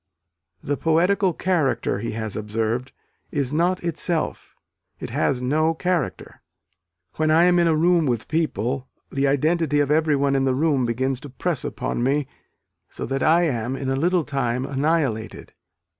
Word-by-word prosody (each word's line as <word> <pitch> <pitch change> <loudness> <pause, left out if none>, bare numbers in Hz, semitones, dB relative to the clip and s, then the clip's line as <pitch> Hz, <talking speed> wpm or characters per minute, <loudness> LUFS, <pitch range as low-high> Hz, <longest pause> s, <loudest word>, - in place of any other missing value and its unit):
"The 145 0 -1
poetical 180 +4 +2
character," 160 - 0
he 115 +1 -4
has 110 -2 -4
observed, 115 +4 -2 0.4
"is 140 -2 -2
not 175 +4 +1
itself 170 0 -2 0.4
it - - -6
has 125 -2 0
no 155 +5 +1
character. 175 -4 -2 0.8
When 155 0 +1
I 160 +2 +5
am 175 0 +4
in 170 - +3
a 160 - +3
room 170 0 +3
with 120 -3 -1
people, 135 -5 -1 0.2
the 140 0 +1
identity 150 +2 +1
of 145 0 +1
everyone 145 -3 +2
in 135 - +2
the 130 -1 +1
room 140 -4 +1
begins 130 +2 -1
to 145 - -10
press 155 +3 -2
upon - - -3
me 140 +3 +1 0.6
so - - -5
that 135 0 -2
I 165 +4 +4
am 125 -5 -1
in 135 -1 -3
a 135 - +1
little 175 +4 +2
time 130 -3 -1
annihilated." 140 -5 -1
145 Hz, 160 wpm, -23 LUFS, 130-165 Hz, 0.8 s, I